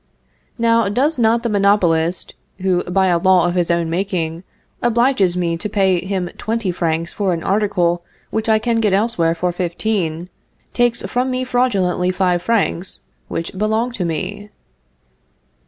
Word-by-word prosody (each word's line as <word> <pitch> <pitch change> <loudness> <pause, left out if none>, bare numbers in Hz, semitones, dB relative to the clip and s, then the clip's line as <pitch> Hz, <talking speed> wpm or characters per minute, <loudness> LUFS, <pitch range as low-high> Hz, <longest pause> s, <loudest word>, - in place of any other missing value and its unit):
_) - - -44 0.5
Now, 230 -2 +2
does 265 +7 0
not 230 0 +3
the 235 - 0
monopolist, 185 -5 +1 0.3
who, 180 -2 +1
by 190 +2 +1
a 175 -2 +2
law 185 -1 +4
of 175 - -1
his 175 -2 0
own 170 -1 +1
making, 170 -1 -2 0.4
obliges 235 -6 +2
me 170 -2 0
to 210 - -4
pay 190 -3 +2
him 190 -2 -2
twenty 225 -4 -1
francs 165 -1 -2
for 195 -3 0
an 165 - -4
article 185 -4 +1 0.3
which 220 +1 -1
I 220 - +5
can 230 +1 0
get 210 -3 +2
elsewhere 190 -6 +1
for 180 +1 -1
fifteen, 175 -1 -2 0.4
take 240 -1 +2
from 250 +1 -2
me 255 0 -1
fraudulently 200 -8 +1
five 180 -1 +1
francs, 195 -4 -1 0.3
which 165 +3 -5
belong 220 +4 0
to 210 -6 -3
me? 170 +5 -4
190 Hz, 155 wpm, -19 LUFS, 175-220 Hz, 0.5 s, I